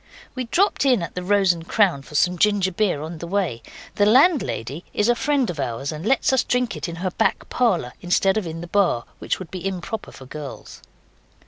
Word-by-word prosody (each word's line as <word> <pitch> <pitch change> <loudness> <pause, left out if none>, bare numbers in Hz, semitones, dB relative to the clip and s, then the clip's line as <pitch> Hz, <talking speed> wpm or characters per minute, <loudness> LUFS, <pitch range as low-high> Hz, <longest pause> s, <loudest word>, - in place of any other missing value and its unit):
We 255 -1 -3
dropped 370 - +2
in 250 -9 +3
at 165 - -6
the 180 - -4
'Rose 195 0 +3
and 165 0 -10
Crown' 190 -10 +2
for 150 - -13
some 180 +5 +3
ginger 205 -3 +3
beer 180 -6 0
on 160 +1 -7
our 170 - -6
way. 180 -12 -1 0.4
The 205 - +4
landlady 220 - +2
is 210 - +2
a 240 - +5
friend 275 +1 +1
of 165 -4 -5
ours 135 +2 -3
and 155 +1 -6
lets 270 +1 +2
us 260 - +3
drink 250 -4 0
it - - -4
in 170 - -6
her 185 - 0
back - - 0
parlour, 185 - +1
instead 190 +2 +2
of 215 -5 -1
in 165 0 -6
the - - -6
bar, 175 -11 +2 0.2
which - - -1
would 185 - -9
be 185 -2 -6
improper 195 +3 -4
for 130 - -12
girls. 145 +1 -9
185 Hz, 220 wpm, -22 LUFS, 165-220 Hz, 0.4 s, a